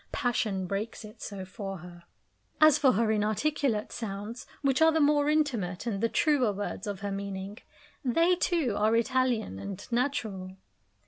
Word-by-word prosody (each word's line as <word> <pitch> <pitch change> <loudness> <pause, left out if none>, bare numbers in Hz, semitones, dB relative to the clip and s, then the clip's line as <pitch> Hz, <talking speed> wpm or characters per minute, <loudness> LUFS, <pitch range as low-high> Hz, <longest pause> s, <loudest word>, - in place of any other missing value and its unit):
Passion 215 -7 0
breaks 205 +4 -4
it 215 - -13
so 195 -2 -6
for 195 0 -6
her. 175 0 -12 0.5
As 310 -2 +7
for 265 -3 +5
her 220 +2 +2
inarticulate 215 +2 0
sounds, 215 +2 -6 0.2
which 270 +1 +2
are 320 0 +7
the 320 - +1
more 290 0 +4
intimate 240 - 0
and 205 -4 -2
the 230 - +2
truer 280 -7 +2
words 205 0 -4
of 200 -1 -4
her 200 -1 -3
meaning, 195 +1 -5 0.4
they, 330 +8 +3
too, 335 - +1
are 215 +2 +3
Italian 235 - +1
and 195 - -6
natural. 215 -7 -2
220 Hz, 155 wpm, -29 LUFS, 195-265 Hz, 0.5 s, As